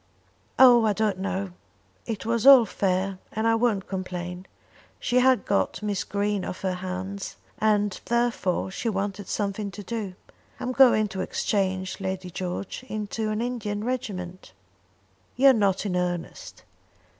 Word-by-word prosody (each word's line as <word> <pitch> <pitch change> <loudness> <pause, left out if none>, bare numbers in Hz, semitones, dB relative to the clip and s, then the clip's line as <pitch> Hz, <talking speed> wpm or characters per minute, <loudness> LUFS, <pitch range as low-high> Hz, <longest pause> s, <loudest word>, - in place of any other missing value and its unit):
"Oh, 245 -3 +8
I 215 -2 +3
don't 210 -2 0
know. 195 0 -3 0.6
It 225 -2 -4
was 230 +2 +1
all 265 -4 +10
fair, 190 -1 -1
and 220 +1 -1
I 225 - +4
won't 225 -4 +1
complain. 180 -1 -5 0.5
She 245 - 0
had 255 -4 +3
got 200 +1 0
Miss 200 -3 -1
Green 205 0 -1
off 185 - -6
her 190 -1 0
hands, 185 +2 -5 0.2
and 210 -2 +1
therefore 235 -6 0
she 230 +4 -2
wanted 200 -1 -3
something 200 0 -2
to 205 +1 -9
do. 210 -4 -4 0.4
I'm 250 - -2
going 250 -5 +5
to 190 -1 -4
exchange, 190 -2 -1
Lady 190 -1 -4
George, 185 +6 -5
into 215 0 -3
an 215 +2 -1
Indian 215 -4 -3
regiment." 185 - -5 0.8
"You're 270 +1 +7
not 200 -3 +1
in 185 -3 -1
earnest." 180 -1 -4
200 Hz, 145 wpm, -26 LUFS, 185-225 Hz, 0.8 s, all